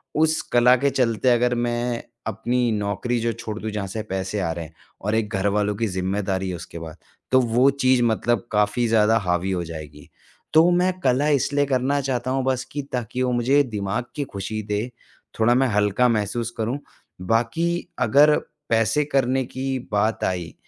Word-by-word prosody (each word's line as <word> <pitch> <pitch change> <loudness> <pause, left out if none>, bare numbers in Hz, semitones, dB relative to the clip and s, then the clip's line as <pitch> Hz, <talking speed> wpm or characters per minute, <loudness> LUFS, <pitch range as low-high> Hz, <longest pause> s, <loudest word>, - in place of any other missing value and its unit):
उस 160 +1 +2
कला 120 +1 +6
के 140 +3 +2
चलते 125 -2 +1
अगर 125 0 +3
मैं 120 0 -1 0.2
अपनी 120 +3 0
नौकरी 105 +3 -1
जो 115 0 0
छोड़ 110 -1 -6
दूँ, 110 - -4
जहाँ 100 -2 -3
से 110 +3 -4
पैसे 95 +2 -2
आ 85 -4 -1
रहे 80 0 -5
हैं 80 - -15 0.3
और 105 +2 -1
एक 110 -2 0
घरवालों 100 +1 +1
की 115 +2 -1
ज़िम्मेदारी 95 0 -2
है 90 - -3
उसके 85 0 -9
बाद, 80 0 -9 0.3
तो 130 - +6
वो 125 +3 +3
चीज़ 130 -3 +2
मतलब 120 +1 +1
काफ़ी 105 +3 +1
ज़्यादा 110 0 +4
हावी 90 -2 -1
हो 90 -2 -1
जाएगी। 75 -3 -9 0.4
तो 160 +2 +6
मैं 180 +1 +3
कला 135 -1 +2
इसलिए 145 0 +2
करना 135 +1 +1
चाहता 130 -2 -2
हूँ 135 0 0
बस 130 -1 0
कि 145 - -3
ताकि 125 0 -3
वो 125 - +1
मुझे 130 +4 +3
दिमाग 110 -1 -3
की 145 - -1
खुशी 110 -2 -5
दे, 105 +4 -3 0.5
थोड़ा 120 +2 +4
मैं 135 +1 +3
हल्का 105 +2 +2
महसूस 115 +1 -1
करूँ, 115 +5 -2 0.4
बाकी 120 - 0
अगर 150 +2 +5 0.3
पैसे 115 +6 +2
करने 135 -2 +1
की 130 +1 -3
बात 105 +2 0
आई, 90 -2 -2
115 Hz, 180 wpm, -23 LUFS, 105-130 Hz, 0.5 s, कला